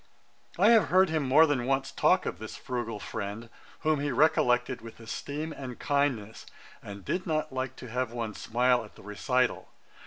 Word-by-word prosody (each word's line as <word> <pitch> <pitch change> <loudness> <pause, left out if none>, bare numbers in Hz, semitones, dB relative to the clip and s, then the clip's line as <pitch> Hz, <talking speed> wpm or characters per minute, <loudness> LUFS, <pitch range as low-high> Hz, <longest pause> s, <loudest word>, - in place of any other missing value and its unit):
I - - +5
have 220 -6 +6
heard 185 -1 +4
him 160 -1 +1
more 145 +4 +6
than 135 -5 0
once 135 0 0
talk - - +3
of - - -4
this - - -7
frugal 120 -4 -4
friend, 110 +4 -6 0.3
whom 155 -2 +2
he 145 0 -1
recollected 125 -3 +2
with 115 0 -11
esteem 145 +7 -5
and 130 -4 -7
kindness, 135 -7 -1 0.3
and 100 -2 -9
did 185 - -2
not 155 -3 -1
like 130 0 -3
to 125 - -10
have 125 -1 -1
one 115 -3 -4
smile 125 +2 +1
at 105 - -14
the - - -15
recital. 125 +5 0
130 Hz, 180 wpm, -29 LUFS, 115-145 Hz, 0.3 s, have